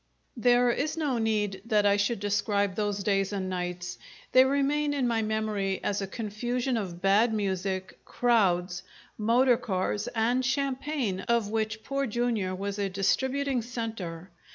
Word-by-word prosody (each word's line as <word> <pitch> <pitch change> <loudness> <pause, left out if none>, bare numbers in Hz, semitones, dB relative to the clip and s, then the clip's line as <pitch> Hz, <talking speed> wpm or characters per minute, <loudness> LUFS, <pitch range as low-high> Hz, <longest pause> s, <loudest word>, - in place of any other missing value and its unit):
There 245 +1 +4
is 300 +6 -2
no 285 -7 0
need 210 -3 0
that 210 -3 +2
I 200 0 +5
should 200 +2 0
describe 205 -1 0
those 205 0 -2
days 195 -1 +1
and 190 -2 -3
nights. 180 -1 -4 0.3
They 255 - +7
remain 285 +2 +1
in 265 -3 +1
my 230 -1 +1
memory 215 -3 -1
as 205 0 -1
a 195 - -3
confusion 240 +5 -2
of 185 -5 -4
bad 205 +4 +4
music, 190 -2 -2
crowds, 185 -7 +1 0.3
motor 235 +3 +3
cars 205 -3 -2
and 240 +3 +2
champagne 265 -5 -1
of 235 -3 +1
which 220 0 -2
Poor 275 0 -1
Jr. 225 -5 -1
was 200 +2 -4
a 200 -1 0
distributing 265 +7 0
centre. 220 -7 -5
215 Hz, 150 wpm, -28 LUFS, 195-245 Hz, 0.3 s, They